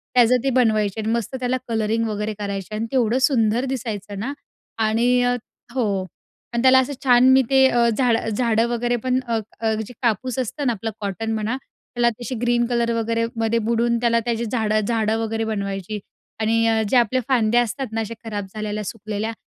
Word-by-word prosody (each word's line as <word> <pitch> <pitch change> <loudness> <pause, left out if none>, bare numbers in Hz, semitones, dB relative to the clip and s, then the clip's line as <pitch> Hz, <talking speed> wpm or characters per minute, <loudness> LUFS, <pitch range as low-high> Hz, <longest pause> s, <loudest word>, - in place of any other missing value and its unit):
त्याचं 245 +1 +5
ते 275 - +2
बनवायचे. 220 -4 +2
आणि 220 - -1
मस्त 235 +2 -2
त्याला 255 0 0
कलरिंग 225 0 0
वगैरे 210 0 -2
करायचे 200 0 -4
आणि 220 +2 -2
ते - - -3
एवढं 240 0 +2
सुंदर 240 -2 +2
दिसायचं 210 -6 -4
ना 255 +7 -3 0.5
आणि 245 +3 +3
अ, 245 0 +2 0.4
हो. 205 -7 0 0.5
आणि 235 - +1
त्याला 260 0 +7
असं 260 +2 -1
छान 250 0 +6
मी 265 - +6
ते 265 -1 +5
अ, 240 -2 +3
झाडं, 230 -1 +1
झाडं 230 +1 +1
वगैरे 240 0 0
पण 255 0 +2
अ, 230 -1 0 0.2
अ, 220 -1 +1
जे 250 - -11
कापूस 245 +2 0
असतं 265 +4 -3
ना, 240 - +2
आपलं 225 +2 -4
कॉटन 215 +2 -3
म्हणा, 220 +4 -1 0.4
त्याला 240 0 +3
तशी 245 +1 -4
ग्रीन 240 0 +2
कलर 235 -1 +1
वगैरेमध्ये 230 0 0
बुडून 235 0 +2
त्याला 230 -1 +3
त्याची 235 -1 -1
झाडं-झाडं 220 -1 0
वगैरे 225 0 -2
बनवायची. 200 -1 -3 0.4
आणि 225 +1 +2
अ, 225 -1 +2
जे 255 - +4
आपल्या 245 +2 +2
फांद्या 240 -2 +3
असतात 240 +3 -3
ना, 225 0 -1
असे 220 +1 -4
खराब 205 -3 -4
झालेल्या, 215 -1 -3
सुकलेल्या, 215 +1 -4
230 Hz, 185 wpm, -22 LUFS, 215-245 Hz, 0.5 s, त्याला